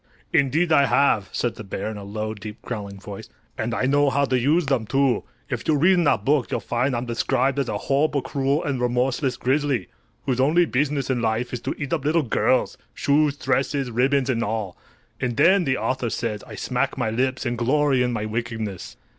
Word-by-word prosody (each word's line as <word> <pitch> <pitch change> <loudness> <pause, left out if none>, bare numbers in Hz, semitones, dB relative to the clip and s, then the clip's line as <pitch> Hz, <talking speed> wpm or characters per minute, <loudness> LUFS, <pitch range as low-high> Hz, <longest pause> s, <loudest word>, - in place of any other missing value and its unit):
"Indeed 155 +5 +2
I 140 -3 +5
have," 110 -9 +2
said 120 - -1
the - - -7
bear, 100 +2 -4
in - - -7
a 100 - -8
low, 110 +2 -4
deep, 105 0 -9
growling 100 -4 -6
voice. 100 -1 -9 0.3
"And 115 +1 -2
I 115 - 0
know 145 +1 +3
how 140 +1 +2
to 130 -2 +1
use 150 +7 +2
them, 130 -6 0
too. 135 -2 +1 0.2
If - - -4
you 155 - +3
read 175 +7 +5
in 175 -2 +2
that 105 -7 +2
book 140 -2 +2
you'll - - -1
find 125 +2 0
I'm 120 +1 -2
described 125 +3 0
as 135 - -1
a - - -1
horrible, 140 0 +1
cruel 140 +3 0
and 135 -4 -2
remorseless 125 +1 0
grizzly, 135 0 0 0.4
whose 130 -2 0
only 160 +7 +4
business 140 -1 0
in 125 -2 0
life 115 +2 -1
is 120 - -3
to - - -3
eat 145 0 -4
up 155 -5 -1
little 155 +2 +2
girls—shoes, 145 +4 +1
dresses, 135 -1 0
ribbons 130 +3 +2
and 115 -2 0
all! 105 -4 -3 0.4
And 125 -3 -2
then, 185 0 +5
the 130 -2 +1
author 130 -2 -1
says, 110 -2 -3
I - - -9
smack - - -1
my 110 - 0
lips 130 +4 -1
and 120 -1 -1
glory 135 +2 +2
in 125 0 +1
my 110 -3 -2
wickedness." 110 -3 -4
130 Hz, 205 wpm, -23 LUFS, 115-140 Hz, 0.4 s, I